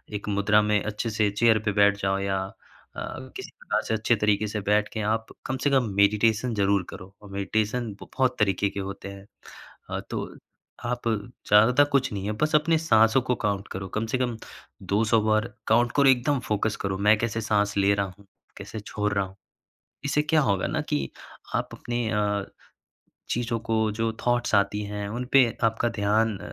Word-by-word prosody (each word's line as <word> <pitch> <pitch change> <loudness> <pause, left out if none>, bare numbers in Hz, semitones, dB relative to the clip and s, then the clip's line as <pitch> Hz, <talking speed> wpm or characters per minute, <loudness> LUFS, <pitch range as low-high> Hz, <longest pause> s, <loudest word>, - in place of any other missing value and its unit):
एक 105 - -5
मुद्रा 105 +1 +3
में 105 -1 +1
अच्छे 105 +2 -3
से 105 -1 +1
चेयर 110 +1 +3
पे 105 - +2
बैठ 100 0 +4
जाओ 95 0 0
या 95 0 -1 0.6
अ, - - -5 0.3
किसी - - -7
प्रकार - - -1
से - - 0
अच्छे 110 +2 +2
तरीके 105 0 +1
से 105 0 -3
बैठ 105 +1 +2
के 110 - -3
आप 110 0 -6 0.2
कम 130 - -2
से - - +5
कम 135 -3 +3
मेडिटेशन 105 +4 +3
ज़रूर 100 -1 +2
करो। 95 +1 -10
और 105 - -13
मेडिटेशन 110 +4 -1
ब - - -10
बहुत 130 -2 +2
तरीके 100 -1 +2
के 100 - -6
होते 100 0 -6
हैं। 100 0 -11 0.6
अ, - - -2
तो - - -5 0.5
आप 120 0 -2
ज़्यादातर 110 +3 +3
कुछ 135 -3 +2
नहीं 100 -1 -4
है 105 - -1
बस 155 0 +2
अपने 160 +2 +3
साँसों 125 -6 +4
को 125 0 0
काउंट 100 0 -1
करो। 95 0 -5
कम 110 - 0
से - - +3
कम 120 -3 -1 0.4
200 110 +2 +2
बार 110 0 +1
काउंट 120 +2 +3
करो। 140 -1 +6
एकदम 130 +2 +2
फोकस 105 0 0
करो 95 -1 -2
मैं 110 - +6
कैसे 115 -1 -1
साँस 105 -1 0
ले 100 0 +4
रहा 100 0 0
हूँ, 100 - -18 0.3
कैसे 110 - -7
छोड़ 105 0 -3
रहा 100 -1 +1
हूँ। 95 0 -13 0.7
इससे 145 +1 +1
क्या 155 +1 +2
होगा 100 -8 +1
ना - - -1
कि 70 -2 -1 0.5
आप - - -2
अपने 120 -1 -3
अ, 105 -2 0 0.9
चीज़ों 120 -1 -1
को 110 -1 0
जो 115 0 0
थॉट्स 120 -2 +1
आती 100 +1 +2
हैं, 105 0 -5
उन 120 +4 -4
पे 135 -2 +7 0.2
आपका 115 +1 +1
ध्यान 110 -1 +1
105 Hz, 190 wpm, -26 LUFS, 100-120 Hz, 0.9 s, पे